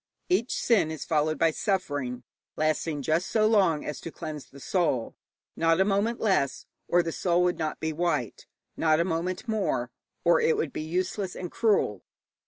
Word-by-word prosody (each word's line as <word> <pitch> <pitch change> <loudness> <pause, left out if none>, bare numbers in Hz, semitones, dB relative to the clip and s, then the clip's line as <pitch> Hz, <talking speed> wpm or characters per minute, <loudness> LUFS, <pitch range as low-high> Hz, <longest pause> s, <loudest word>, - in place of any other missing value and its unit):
Each 310 -9 +1
sin 220 -9 +2
is 160 -2 -5
followed 155 0 +1
by 165 -1 +3
suffering, 145 - -2 0.3
lasting 155 -1 0
just 165 +6 +1
so 215 +2 +3
long 195 -8 +3
as 150 - -5
to - - -6
cleanse 155 -5 -7
the 140 - -13
soul 145 -7 0 0.4
not 165 +1 +2
a 190 - +5
moment 210 +4 +1
less, 190 -11 +1 0.2
or 175 0 +3
the 165 - -3
soul 175 +1 +1
would 180 0 +1
not 155 -1 -2
be 160 0 -2
white; 150 -8 -2 0.3
not 155 -1 +3
a 170 - +2
moment 180 +4 -2
more, 220 -3 -1 0.3
or - - +4
it 465 -1 +3
would 445 - -2
be - - -3
useless 180 +4 -2
and 180 -2 -6
cruel. 200 - +1
170 Hz, 180 wpm, -27 LUFS, 155-195 Hz, 0.4 s, a